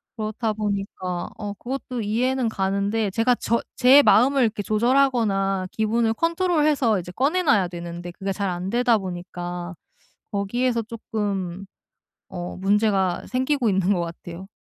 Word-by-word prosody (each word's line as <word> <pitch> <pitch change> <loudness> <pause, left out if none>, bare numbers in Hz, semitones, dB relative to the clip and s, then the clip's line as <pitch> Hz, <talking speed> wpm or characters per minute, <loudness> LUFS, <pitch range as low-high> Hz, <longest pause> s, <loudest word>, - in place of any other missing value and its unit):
그렇다 220 0 -2
보니까 195 -4 -3
어 205 -1 -5 0.3
그것도 250 -3 -4
이해는 240 +4 0
가는데 200 +1 -1
제가 230 +4 +2
저 235 0 0
제 260 +3 +7
마음을 255 +4 +4
이렇게 215 -3 0
조절하거나 215 -5 +2
기분을 225 +1 +1
컨트롤해서 305 - +2
이제 180 0 -8
꺼내 285 - +1
놔야 215 - +3
되는데 175 0 -7
그게 195 +3 -4
잘 200 0 -2
안되다 220 +7 +1
보니까 175 -1 -6 0.6
거기에서 235 +4 0
쪼끔 200 -5 -4 0.6
어 175 0 -6
문제가 195 -2 +1
생기고 255 -1 +1
있는 190 0 +2
것 180 - -1
같아요. 170 +2 -7
210 Hz, 310 characters per minute, -23 LUFS, 190-245 Hz, 0.6 s, 제